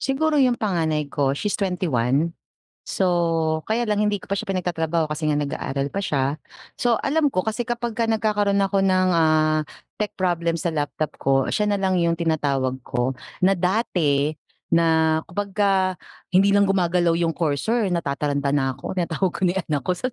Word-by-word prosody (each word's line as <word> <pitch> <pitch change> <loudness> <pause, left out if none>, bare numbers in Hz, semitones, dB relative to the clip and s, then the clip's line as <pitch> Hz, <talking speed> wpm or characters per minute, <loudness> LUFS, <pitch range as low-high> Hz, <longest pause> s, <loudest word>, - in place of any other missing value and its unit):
Siguro 295 +2 +1
yung 250 -3 +3
panganay 160 -7 -1
ko, 140 -2 +1
she's 210 +4 -2
21, 165 - 0 0.5
so, 165 -4 0
kaya 225 +2 0
lang 210 - +1
hindi 210 -1 0
ko - - -15
pa 200 - 0
siya 220 - -4
pinagtatrabaho 170 -4 -1
kasi 150 +1 -3
nga 155 - +2
nag-aaral 140 -1 -2
pa - - -6
siya. 140 0 0 0.4
So, 235 -2 +1
alam 295 0 +1
ko 185 - +2
kasi 220 +4 -3
kapagka 235 -1 -2
nagkakaroon 210 -3 +1
ako 195 0 +1
ng, 185 -1 +3
ah, 155 -2 +2 0.3
tech 210 -1 -2
problem 170 -2 0
sa 170 +1 -2
laptop 150 -1 -3
ko, 135 -1 +1
siya 210 - 0
nalang 195 -3 +1
yung 170 -1 +2
tinatawag 145 -6 0
ko, 125 +2 -2 0.2
na 190 +1 +3
dati 160 -6 +1 0.3
na 160 -1 +3
kapagka 195 0 0 0.3
hindi 195 +2 +4
lang 200 0 +5
gumagalaw 175 -2 +2
yung 165 -1 0
cursor 180 - 0
natataranta 140 -3 -1
na 135 -2 +1
ako 185 - -7
tinatawag 175 +1 0
ko - - -8
na 175 - +3
yung 190 - -2
anak 145 -3 0
ko, - - +1
sa 180 - -3
175 Hz, 170 wpm, -23 LUFS, 155-200 Hz, 0.5 s, lang